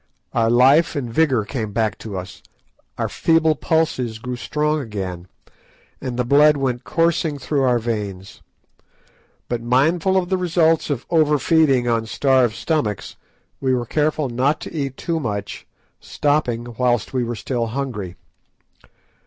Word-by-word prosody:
Our 115 -1 +2
life 135 +8 +4
and 125 -5 -4
vigour 130 -7 +2
came 110 -3 -4
back 110 -1 -1
to 105 -4 -6
us, 90 +1 -8 0.6
our - - -1
feeble 165 -1 +2
pulses 145 -7 -1
grew 125 +3 -5
strong 150 +4 -1
again, 95 -8 -5 0.7
and 125 -2 -4
the 125 - 0
blood 145 +3 +5
went 130 -2 -2
coursing 165 -2 0
through 140 +2 -1
our 125 -2 +3
veins. 105 -4 -5 1.1
But 120 -1 -2
mindful 160 +10 +2
of 180 -2 0
the 190 - +1
results 165 -3 +2
of 135 -4 -2
over 155 -3 +3
feeding 140 -5 +3
on 115 -1 0
starved 130 -2 +2
stomachs, 130 - -2 0.4
we 130 -1 +1
were 120 -1 -2
careful 150 +3 0
not 130 +5 0
to - - -8
eat 140 -4 -3
too 165 -2 -2
much, 105 -7 -5 0.3
stopping 120 -5 -1
whilst 120 -2 +1
we 130 -2 0
were 120 0 -3
still 115 +1 -2
hungry. 110 -7 -4
130 Hz, 145 wpm, -21 LUFS, 115-150 Hz, 1.1 s, blood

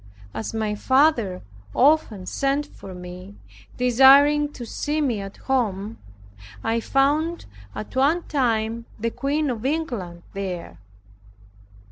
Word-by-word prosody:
As 115 - -4
my 220 -1 -1
father 245 -5 +2 0.3
often 255 -9 +3
sent 275 +7 0
for 195 -9 -11
me, 180 +2 -10 0.4
desiring 275 +4 +6
to 240 - -7
see 295 +6 -2
me 245 -9 0
at 195 0 -8
home, 225 -5 -1 0.6
I 230 +1 +1
found 295 +7 +1 0.3
at 215 - -7
one 295 +7 +3
time 230 -4 -1
the 230 +2 -1
Queen 285 +2 -1
of 230 -2 -5
England 240 - -3
there. 185 - -5
245 Hz, 115 wpm, -23 LUFS, 205-285 Hz, 0.6 s, desiring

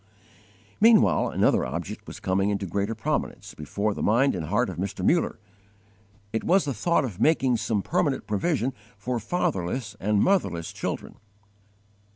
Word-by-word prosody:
Meanwhile 220 -1 +5
another - - +2
object - - -5
was - - -8
coming 95 +2 +1
into 100 -1 -1
greater 100 +5 -2
prominence 110 - -3
before 100 +8 -2
the - - -6
mind 125 +6 +3
and 85 -4 -4
heart 105 +8 +1
of 95 - -6
Mr. 95 0 -3
Muller: 170 0 +2 1.0
it 110 - -1
was 185 +1 +3
the 140 - -1
thought 170 - +1
of 105 -7 -7
_making 130 -4 +3
some 110 -2 -1
permanent 165 -6 0
provision 130 - 0 0.2
for 125 -1 -2
fatherless 110 - -2
and 105 +1 +1
motherless 100 - +1
children. - - -5
110 Hz, 150 wpm, -26 LUFS, 100-140 Hz, 1.0 s, Meanwhile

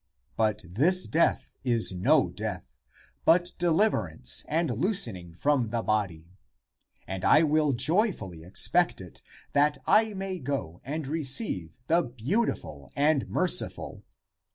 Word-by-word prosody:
But 110 -1 0
this 155 - +3
death 165 - 0
is 120 -5 +1
no 90 0 +3
death, - - -6 0.5
but 175 +2 +3
deliverance 160 - 0
and 165 +2 0
loosen 185 - +4
ing 85 -2 -12
from 135 +1 0
the 115 0 -2
body. 95 -4 -3 0.7
And 95 -1 -5
I 155 - +5
will 155 -2 +2
joyfully 125 - 0
expect 170 - 0
it 90 -2 -12 0.3
that 145 +1 +2
I 215 -1 +3
may 190 -1 -5
go 130 - -5
and 150 +3 -5
receive 135 - -1
the 165 +5 +2
Beautiful 120 - -3
and 145 -1 +1
Merci - - +3
ful. - - -10
135 Hz, 130 wpm, -27 LUFS, -, 0.7 s, I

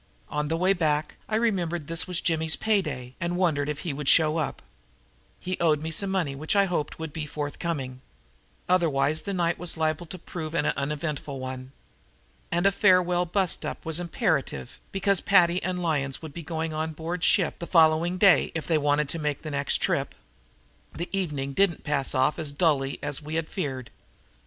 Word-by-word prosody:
On 150 0 -1
the 165 +2 0
way 185 +3 +3
back 155 -4 0
I 215 - 0
remembered 180 -8 0
this 165 +4 +1
was 180 -2 +1
Jimmy's 160 -1 +1
pay 215 -2 +2
day 125 -7 -6
and 175 +1 -1
wondered 155 -6 +1
if 150 -1 -3
he 165 - -3
would 140 0 -1
show 155 -1 +5
up. 155 - -3 0.8
He 185 0 -4
owed 155 -3 +3
me 160 +2 -4
some 195 +5 0
money 180 -7 0
which 155 +7 -2
I 200 0 +5
hoped 170 -5 -2
would 160 -2 -6
be 155 -2 -4
forthcoming. 145 -3 -4 0.7
Otherwise 155 -4 +2
the 200 - -4
night 170 -1 0
was 175 -2 0
liable 160 +1 -1
to 185 - -7
prove 165 -2 -6
an 150 - +1
uneventful 145 -1 -2
one. 130 0 -6 0.8
And 175 +2 +1
a 195 - +6
farewell 180 -3 +3
bust 185 0 0
up - - -5
was 160 +1 +1
imperative 170 - -2
because 195 -1 +1
Paddy 180 -2 +4
and 180 -1 -2
Lyons 140 -5 0
would 160 - -8
have - - -23
to 170 - -6
go 160 0 -4
on 160 0 -2
board 165 +3 -4
ship 180 -5 +3
the 170 - -5
following 165 +1 +4
day 195 -1 +5
if 165 - -3
they 160 -2 +2
wanted 145 0 +2
to 165 - -1
make 150 -1 -2
the 155 - -5
next 140 0 +1
trip. - - -1 0.8
The 170 +2 -4
evening 150 -8 -1
didn't 195 +1 +2
pass 145 -3 -1
off 130 +5 +2
as 155 -3 0
dully 145 -3 +1
as 145 +1 -1
we 155 +1 -6
had 165 -1 -1
feared. 135 - -4
160 Hz, 195 wpm, -26 LUFS, 150-175 Hz, 0.8 s, a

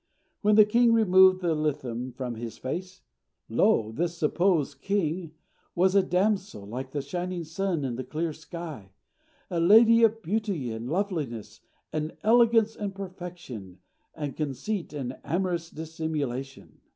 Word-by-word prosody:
When 210 0 +4
the 215 -1 +8
king 235 +2 +4
removed 190 -4 +6
the 170 -2 +1
litham 130 -5 -2
from 125 -1 -4
his 115 0 -7
face, 180 +8 -5 0.5
lo! 110 -1 +3
this 170 +7 -2
supposed 155 -3 +1
king 175 -4 -1 0.4
was 185 +2 +3
a 200 - +6
damsel, 190 - 0
like 125 +5 -6
the 145 0 -3
shining 175 +4 -4
sun 165 -1 -2
in 120 -3 -3
the 130 - -3
clear 160 +2 -3
sky, 155 - -9 0.6
a 170 - 0
lady 225 +6 +7
of 225 -1 +3
beauty 195 - -1
and 110 +2 -5
loveliness, 155 - -3 0.3
and 155 0 -3
elegance 225 -1 +4
and 200 -2 -4
perfection, 175 - -8 0.4
and 145 -3 -4
conceit 155 - -3
and 135 -4 -5
amorous 175 -2 -1
dissimulation. 150 -5 -5
165 Hz, 140 wpm, -27 LUFS, 135-195 Hz, 0.6 s, the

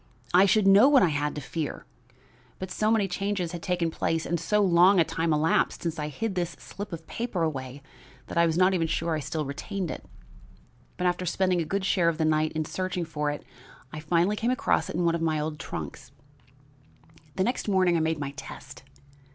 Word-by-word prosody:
I 190 +3 +6
should 215 0 +3
know 200 +7 +7
what 275 -3 +6
I 180 - +4
had 150 0 -1
to 150 - -4
fear. 150 +2 -5 0.7
But 185 0 -6
so 215 - 0
many 220 -3 +2
changes 195 -2 -2
had 175 -2 -6
taken 175 -2 -1
place 165 0 -1
and 170 0 -1
so 210 +6 +1
long 180 +1 +5
a - - +6
time 165 0 -1
elapsed 155 +2 +1
since 165 -2 -3
I 150 - -2
hid 210 +8 -3
this 175 -2 -2
slip 205 +1 -8
of 165 -1 -7
paper 230 -6 -3
away 135 -3 -4 0.4
that - - -8
I 170 0 +4
was 160 0 0
not 185 +1 +4
even 165 -3 +1
sure 165 0 -1
I 155 - 0
still 150 +2 -3
retained 180 +6 -4
it; - - -7 0.9
but 180 - -2
after 180 0 0
spending 180 0 +1
a - - -2
good 195 +4 -2
share 175 -3 +3
of 165 - -2
the 160 - +1
night 155 0 +2
in 155 -1 -2
searching 185 +1 -3
for 150 -2 -2
it, 145 - -5 0.5
I 155 - -5
finally 170 +6 +1
came 230 +3 -1
across 255 - +1
it - - -5
in 175 +1 0
one 170 - +3
of 170 - -2
my 160 -2 +1
old 150 0 -4
trunks. - - -7 1.2
"The 190 - +1
next 245 +2 -2
morning 185 -3 +3
I - - +2
made 160 0 0
my 140 -2 -4
test. 140 - -10
170 Hz, 215 wpm, -27 LUFS, 155-190 Hz, 1.2 s, know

